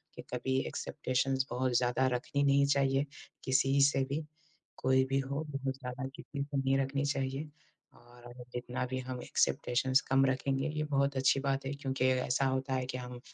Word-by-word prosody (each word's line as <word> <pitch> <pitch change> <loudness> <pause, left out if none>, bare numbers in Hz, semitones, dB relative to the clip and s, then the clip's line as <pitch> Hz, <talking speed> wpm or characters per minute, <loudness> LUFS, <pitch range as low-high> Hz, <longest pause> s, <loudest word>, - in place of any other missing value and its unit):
कि - - -7
कभी 130 +2 0
एक्सपेकटेशन्स 130 +1 -1
बहुत 125 0 +1
ज़्यादा 125 +2 +2
रखनी 140 +3 -1
नहीं 140 0 +4
चाहिए 140 0 +2 0.4
किसी 135 +1 +3
से 135 -2 +1
भी। 150 +3 -2 0.5
कोई 130 0 +3
भी 135 0 +2
हो 140 +3 -2
बहुत 135 -1 -3
ज़्यादा 130 0 -5
किसी 140 -1 -5
से 140 -1 -4
नहीं 135 0 +2
रखनी 135 +1 0
चाहिए, 140 +1 -2 0.4
और 120 0 -18
हम 120 0 -10
जितना 125 +1 -3
भी 130 +1 -3
हम 125 -1 -5
एक्सपेकटेशन्स 130 +2 +2
कम 135 0 +5
रखेंगे 135 +1 0
ये 150 0 -2
बहुत 140 -1 +1
अच्छी 130 +1 +3
बात 135 0 -1
है 135 - -2
क्योंकि 135 -2 -1
ऐसा 130 +1 +2
होता 130 0 0
है 130 -1 0
कि, 130 0 -4
हम 125 -1 -7
135 Hz, 180 wpm, -32 LUFS, 130-140 Hz, 0.5 s, कम